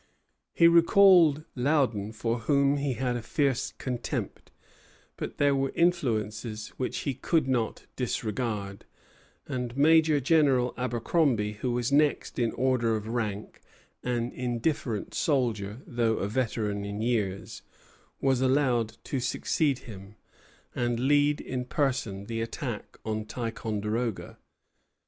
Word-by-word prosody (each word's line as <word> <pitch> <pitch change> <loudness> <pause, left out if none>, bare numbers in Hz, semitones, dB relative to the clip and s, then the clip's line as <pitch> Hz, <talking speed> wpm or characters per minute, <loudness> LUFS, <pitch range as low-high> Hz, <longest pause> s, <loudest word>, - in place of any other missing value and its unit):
He 170 - +5
recalled 170 -2 +6
Loudon, 125 -6 +1
for 115 +1 -2
whom 140 +4 +2
he 140 -2 -1
had 125 +1 -1
a 120 - -3
fierce 135 +2 0
contempt; 125 -2 -4 0.7
but - - -6
there 145 -1 +3
were 135 0 0
influences 110 -10 0
which 130 - -2
he 140 - -2
could 150 +3 0
not 120 -4 -1
disregard, 110 -4 -3 0.6
and 125 -1 -4
Major 155 0 +5
General 135 -4 +3
Abercromby, 120 -2 0
who 125 -2 0
was 120 +1 -1
next 145 -1 +2
in 115 -2 +1
order 125 -3 +1
of 110 0 -5
rank, 110 -3 -3 0.4
an 120 -1 -2
indifferent 120 -2 -2
soldier, 115 -5 -1
though 115 -2 0
a 100 - -1
veteran 105 -3 -1
in 100 +1 -4
years, 105 -5 -2 0.6
was 135 -2 +2
allowed 130 -4 +1
to 135 - -2
succeed 135 +3 0
him, 100 -2 -11 0.6
and 120 -1 -1
lead 145 +2 +3
in 125 -1 -4
person 125 -7 -1
the 115 +1 -3
attack 115 0 -5
on 110 -1 -2
Ticonderoga. 110 -1 -3
125 Hz, 120 wpm, -28 LUFS, 110-140 Hz, 0.7 s, recalled